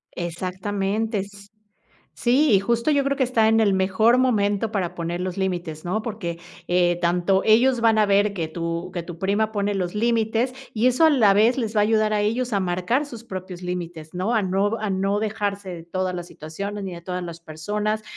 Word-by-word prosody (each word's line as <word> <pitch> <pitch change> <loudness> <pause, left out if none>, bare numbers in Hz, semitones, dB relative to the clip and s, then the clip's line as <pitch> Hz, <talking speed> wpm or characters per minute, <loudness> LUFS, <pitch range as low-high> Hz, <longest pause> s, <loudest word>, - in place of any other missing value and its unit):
Exactamente. 195 +5 -2
S 200 +1 -9 0.7
sí, 265 +5 +3
y 195 - +5
justo 235 +7 0
yo 285 -2 +3
creo 275 0 0
que 270 - 0
está 235 -3 +3
en 225 0 +4
el 210 -3 +3
mejor 195 +6 +3
momento 215 -4 +1
para 185 -4 -2
poner 170 +1 -3
los 185 -1 -3
límites, 175 -5 -3
¿no? 200 +5 -1
Porque, 200 -7 -5 0.3
eh, 175 -1 +2
tanto 180 +3 +2
ellos 240 +3 +4
van 225 -1 +4
a 210 - +4
ver 200 +1 +2
que 170 -4 -2
tu 170 +2 -4
que 175 -1 -3
tu 170 -1 -9
prima 205 +4 0
pone 205 -1 0
los 180 -1 -2
límites. 230 +2 +1 0.2
Y 225 +2 +2
eso 255 +6 +3
a - - +6
la 230 -9 +5
vez 220 +5 +4
les 225 -3 -2
va - - +5
a - - +4
ayudar 215 0 +2
a 210 - +1
ellos 235 +4 -1
a 200 - +2
marcar 185 +10 0
sus 235 -4 -10
propios 185 -4 -7
límites, 175 -3 -5
¿no? 190 +7 -1
A 220 - +2
no 195 +3 0
a 215 -1 -2
no 195 +2 0
dejarse 205 -3 -3
de 170 -2 -7
todas 185 +1 -2
las 175 -1 -5
situaciones, 200 +7 -6
ni 190 - -5
de 170 - -9
todas 180 +1 -4
las 170 -1 -8
personas, 210 +7 -3
200 Hz, 210 wpm, -23 LUFS, 180-220 Hz, 0.7 s, a